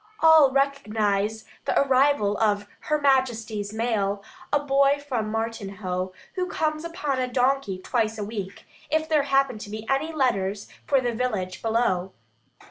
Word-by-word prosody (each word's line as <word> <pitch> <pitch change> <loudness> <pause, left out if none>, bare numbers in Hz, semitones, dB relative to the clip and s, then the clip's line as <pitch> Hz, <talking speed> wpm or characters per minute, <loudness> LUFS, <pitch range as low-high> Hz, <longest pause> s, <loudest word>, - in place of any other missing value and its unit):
All 320 -3 +7
recognise 220 -6 0 0.2
the - - +2
arrival 265 -6 +3
of 205 -2 +2 0.2
Her 300 0 +2
Majesty's 230 -7 +1
mail, 210 -3 -1 0.3
a 290 - +3
boy 280 0 +3
from 250 -7 -3
Martinhoe, 200 -5 -3 0.2
who 365 -1 -2
comes 310 -2 -1
upon 315 -6 -2
a 255 - 0
donkey 255 -5 +1
twice 225 +3 -1
a 210 - -3
week, 200 -2 -6 0.2
if 315 +1 +1
there 310 -2 +3
happen 270 -4 +2
to 210 - -8
be 215 +1 -7
any 275 +4 0
letters 210 -9 0 0.2
for 275 -2 +3
the 240 -1 -1
village 205 -7 -2
below. 220 -5 0
235 Hz, 145 wpm, -25 LUFS, 205-275 Hz, 0.3 s, All